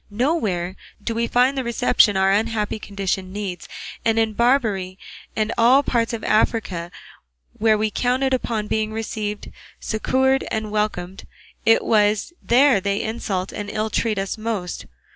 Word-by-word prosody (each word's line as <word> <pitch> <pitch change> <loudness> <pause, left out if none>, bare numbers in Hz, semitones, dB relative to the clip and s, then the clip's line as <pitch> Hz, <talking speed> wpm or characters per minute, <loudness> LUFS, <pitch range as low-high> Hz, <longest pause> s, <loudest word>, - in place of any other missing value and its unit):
Nowhere 205 - -1 0.2
do 220 +3 -3
we 230 +1 0
find 250 +4 +3
the 265 - -1
reception 235 -3 +3
our 190 0 +3
unhappy 215 +1 0
condition 195 -2 -3
needs; 195 -3 -5 0.4
and 225 0 +2
in 225 -1 +2
Barbary 215 -6 +1 0.4
and 220 0 0
all 255 +5 +6
the - - -4
parts 230 -1 +1
of 230 -2 -5
Africa 210 -6 0 0.7
where 220 -1 +4
we 215 0 0
counted 260 +3 +1
upon 230 -4 -1
being 215 0 -1
received, 215 -1 -4 0.3
succoured, 265 +4 +1
and 220 -1 -3
welcomed, 195 -3 -2 0.4
it 225 - +5
is 210 +6 +2
there 255 -3 +4
they 200 +1 -1
insult 200 -4 -3
and 205 -1 -5
ill 215 0 -2
treat 220 -1 0
us 195 +3 -3
most. 215 -6 -4
215 Hz, 150 wpm, -22 LUFS, 200-235 Hz, 0.7 s, all